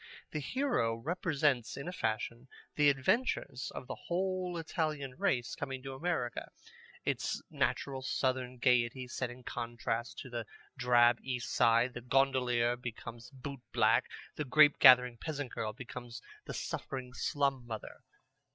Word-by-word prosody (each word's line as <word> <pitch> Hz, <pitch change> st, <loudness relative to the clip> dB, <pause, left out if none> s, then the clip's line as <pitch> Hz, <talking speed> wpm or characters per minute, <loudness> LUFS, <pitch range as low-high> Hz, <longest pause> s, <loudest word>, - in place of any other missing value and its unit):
The 155 Hz, -, -2 dB
hero 240 Hz, -, 0 dB
represents 145 Hz, -2 st, 0 dB
in 140 Hz, -, -6 dB
a -, -, -2 dB
fashion 115 Hz, -3 st, -2 dB, 0.3 s
the 145 Hz, -1 st, +5 dB
adventures 140 Hz, -, 0 dB
of -, -, -6 dB
the -, -, -5 dB
whole 185 Hz, 0 st, -2 dB
Italian 155 Hz, -5 st, -2 dB
race 120 Hz, -2 st, 0 dB
coming 130 Hz, -1 st, -5 dB
to 135 Hz, -1 st, -5 dB
America: 150 Hz, -4 st, -2 dB, 0.6 s
its -, -, -1 dB
natural 135 Hz, -1 st, -1 dB
southern 130 Hz, -1 st, -1 dB
gayety 125 Hz, +1 st, +2 dB
set 125 Hz, 0 st, -3 dB
in 125 Hz, +1 st, -11 dB
contrast 120 Hz, 0 st, -3 dB
to 130 Hz, -, -10 dB
the 120 Hz, -2 st, -4 dB, 0.3 s
drab 120 Hz, -2 st, +5 dB
East 125 Hz, -2 st, -3 dB
Side. 115 Hz, +2 st, +4 dB
The 120 Hz, -, -6 dB
gondolier 125 Hz, -2 st, +2 dB
becomes 120 Hz, -1 st, -8 dB
boot 135 Hz, -1 st, -8 dB
black. -, -, +4 dB, 0.3 s
The 150 Hz, -, 0 dB
grape 145 Hz, +2 st, +6 dB
gathering 125 Hz, -3 st, +8 dB
peasant 145 Hz, -5 st, -4 dB
girl 110 Hz, -1 st, -3 dB
becomes 120 Hz, 0 st, -8 dB, 0.3 s
the -, -, -4 dB
suffering 130 Hz, -2 st, -4 dB
slum 135 Hz, 0 st, 0 dB
mother. 110 Hz, -2 st, -6 dB
130 Hz, 140 wpm, -33 LUFS, 120-140 Hz, 0.6 s, gathering